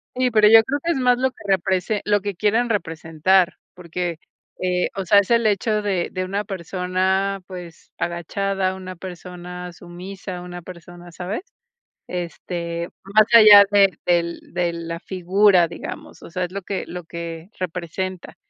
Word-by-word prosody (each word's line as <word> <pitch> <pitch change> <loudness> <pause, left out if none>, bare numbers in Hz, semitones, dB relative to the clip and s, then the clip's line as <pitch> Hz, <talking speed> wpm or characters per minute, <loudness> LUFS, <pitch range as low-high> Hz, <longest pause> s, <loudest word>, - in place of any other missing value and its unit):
Sí, 255 0 +2
pero 215 -2 +5
yo 225 0 +9
creo 285 +4 -1
que 340 - +1
es 330 - 0
más 250 -1 +3
lo 260 0 +1
que - - -19
represe 190 +2 +1
lo 205 0 +2
que 205 -1 -4
quieren 220 +6 +2
representar 165 -1 +1 0.2
porque, 175 -1 -4 0.4
eh, 180 -1 0
o 195 -1 -3
sea, 200 +3 +6
es 200 +3 -1
el 235 -1 +4
hecho 210 +1 +1
de 190 -4 -1
de 185 0 -3
una 200 +3 -2
persona, 190 +1 -1
pues, 180 -3 -11
agachada, 190 +2 -2
una 185 -1 -8
persona 180 0 -8
sumisa, 180 +2 -8
una 175 0 -8
persona, 175 0 -12
¿sabes? 185 - -4 0.7
Este, 170 -1 -4 0.2
más 210 +2 +4
allá 210 -3 +10
de 200 -2 +4
del 170 -1 +1
de 175 -1 0
la 165 0 -5
figura, 185 0 +3
digamos. - - -8
O - - -11
sea, 180 +2 -3
es 175 - -5
lo 200 0 -5
que 195 +1 -4
lo 180 0 -7
que 170 0 -7
representa. 180 +1 -4
185 Hz, 160 wpm, -22 LUFS, 175-200 Hz, 0.7 s, allá